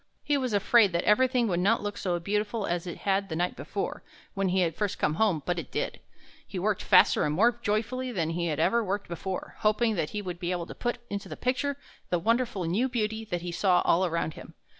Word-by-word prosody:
He 295 - +1
was 260 -3 -1
afraid 205 -1 +4
that 170 - +1
everything 250 +2 +3
would 175 -4 0
not 205 +5 +2
look 205 0 -3
so 175 -2 -1
beautiful 210 +4 -1
as 175 +1 -2
it 175 - -5
had 195 0 +1
the 160 - -3
night 175 +2 -1
before, - - -4 0.3
when 195 -2 0
he 185 +1 +2
had 165 -2 +1
first 205 -2 -2
come 150 - +1
home, 175 -5 +1
but 175 -1 0
it 155 - -7
did. - - -2 0.5
He - - -6
worked - - 0
faster - - +5
and 150 0 0
more 235 +6 +3
joyfully 240 +4 -1
than 165 -7 -1
he 170 +1 -1
had 155 -3 -2
ever 235 0 +3
worked 200 0 -2
before, 185 +2 -5
hoping 220 +2 +2
that 155 - -1
he 210 -1 -4
would 180 -2 -5
be 175 -1 -3
able 175 -2 -2
to - - -9
put 240 -1 -2
into 200 -1 -4
the - - -7
picture 270 +3 -1 0.3
the 175 - +2
wonderful 230 +1 0
new 200 +11 +1
beauty 220 -2 -2
that 175 -5 -3
he 175 - -4
saw 180 +1 +3
all 175 +3 +4
around 170 -3 -1
him. - - -12
200 Hz, 235 wpm, -28 LUFS, 175-225 Hz, 0.5 s, faster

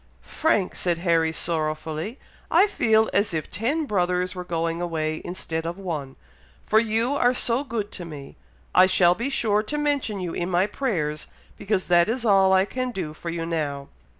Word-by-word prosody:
"Frank!" 215 - 0
said 175 -2 0
Harry, 165 -2 +2
sorrowfully, 160 - -2 0.3
"I 350 +5 +5
feel 220 - +2
as 200 -4 +1
if 155 - -4
ten 285 +9 -1
brothers 180 -4 0
were 180 -1 -6
going 165 -1 -2
away 155 -2 -2
instead 165 -2 -4
of 170 +2 -4
one, 155 -8 -5 0.5
for 220 - +4
you 230 +3 0
are 250 -3 +2
so 245 +2 +2
good 225 -6 -4
to 180 - -7
me! 145 -4 -9 0.4
I 185 +1 +7
shall 180 -2 +5
be 235 +8 -3
sure 215 -6 +1
to 290 +8 -4
mention 285 -8 -1
you 180 -2 -4
in 175 +1 -2
my 180 +1 +3
prayers, 170 - -2 0.3
because 200 -2 -1
that 175 +2 +5
is 240 +1 -2
all 195 -3 +5
I 190 0 +4
can 255 +4 -3
do 180 -10 -5
for 170 +2 -7
you 165 0 -3
now." 145 -4 -3
185 Hz, 180 wpm, -24 LUFS, 165-220 Hz, 0.5 s, I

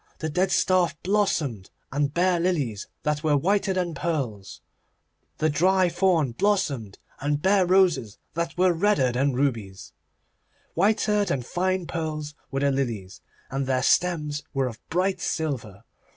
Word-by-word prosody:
The 160 - -3
dead 185 +4 +1
staff 180 -5 +2
blossomed, 160 - 0 0.2
and 145 +1 0
bare 175 +2 +2
lilies 145 - -1 0.2
that 150 0 -1
were 150 -2 +3
whiter 195 +6 +1
than 180 -3 -1
pearls. 135 - -3 0.8
The 155 - +1
dry 185 +4 +3
thorn 170 -6 +2
blossomed, 140 - 0 0.2
and 145 +1 0
bare 190 +2 +3
roses 180 - +3 0.2
that 170 +1 -3
were 180 0 +4
redder 165 -8 +2
than 135 +3 +1
rubies. 115 -8 -2 0.8
Whiter 210 +2 +2
than 140 -10 -1
fine 185 +5 -1
pearls 155 -3 -4 0.2
were 135 0 -2
the 140 0 +3
lilies, 115 -9 -3 0.3
and 135 0 -2
their 130 -1 +1
stems 150 -3 +1
were 135 -1 +2
of 115 -3 -5
bright 185 +2 0
silver. 120 - -3
155 Hz, 140 wpm, -25 LUFS, 135-185 Hz, 0.8 s, were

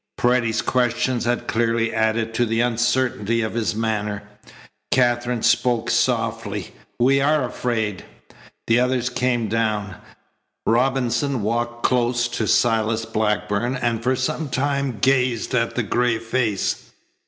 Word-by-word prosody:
Paredes's 120 -2 +1
questions 125 0 0
had 120 0 -1
clearly 115 0 0
added 110 0 0
to 120 - +1
the 115 +1 0
uncertainty 120 -2 +1
of 110 - -3
his 115 -2 -1
manner. 105 -2 -2 0.7
Katherine 120 -2 +1
spoke 120 -2 +2
softly: 115 -5 -1 0.3
"We 135 +3 +4
are 150 -1 +2
afraid." 110 -6 -2 0.6
The 115 +1 +3
others 125 -1 0
came 120 -2 0
down. 105 -3 -1 0.7
Robinson 130 +1 +1
walked 120 +2 -2
close 120 -1 +2
to 110 -2 -2
Silas 115 0 +2
Blackburn 105 +3 -1
and 120 -3 -1
for 130 +2 +1
some 135 +4 -2
time 140 -2 -1
gazed 125 0 +1
at 115 -2 0
the 125 - 0
gray 120 +2 +1
face. 115 -3 -1
120 Hz, 125 wpm, -22 LUFS, 110-125 Hz, 0.7 s, We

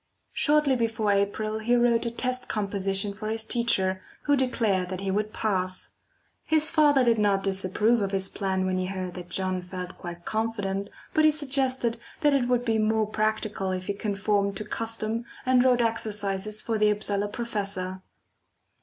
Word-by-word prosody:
Shortly 300 -2 +3
before 225 -3 0
April 210 +2 0
he 240 +3 +2
wrote 240 -1 +3
a - - +1
test 255 +2 -1
composition 200 -1 0
for 215 +2 -6
his 225 0 0
teacher, 190 -6 +1 0.2
who 290 - +3
declared 225 -8 +1
that 185 0 -4
he 195 -1 -1
would 210 +2 -1
pass. 185 -4 -1 0.5
His 315 -1 +2
father 295 -4 +5
did 230 -2 +3
not 200 -2 +2
disapprove 195 +4 +2
of 200 - 0
his 195 -1 0
plan 190 -1 -1
when 185 0 0
he 185 - -1
heard 185 -2 -4
that 180 -1 -8
John 185 0 -1
felt 180 0 -7
quite 175 -1 -8
confident, 205 -3 -2 0.2
but 310 - +3
he 310 - +7
suggested 265 -5 0 0.2
that 295 -2 +4
it 260 -3 +2
would 245 -1 +1
be 225 -2 +1
more 220 0 +2
practical 215 -2 -1
if 185 0 -3
he 200 - -1
conformed 200 -1 0
to 215 - -4
custom 225 0 -3 0.2
and 255 -1 +4
wrote 250 -2 +4
exercises 215 -2 -1
for 225 -2 -1
the 210 0 +4
Upsala 205 -1 0
professor. 200 -5 -4
215 Hz, 170 wpm, -26 LUFS, 195-235 Hz, 0.5 s, he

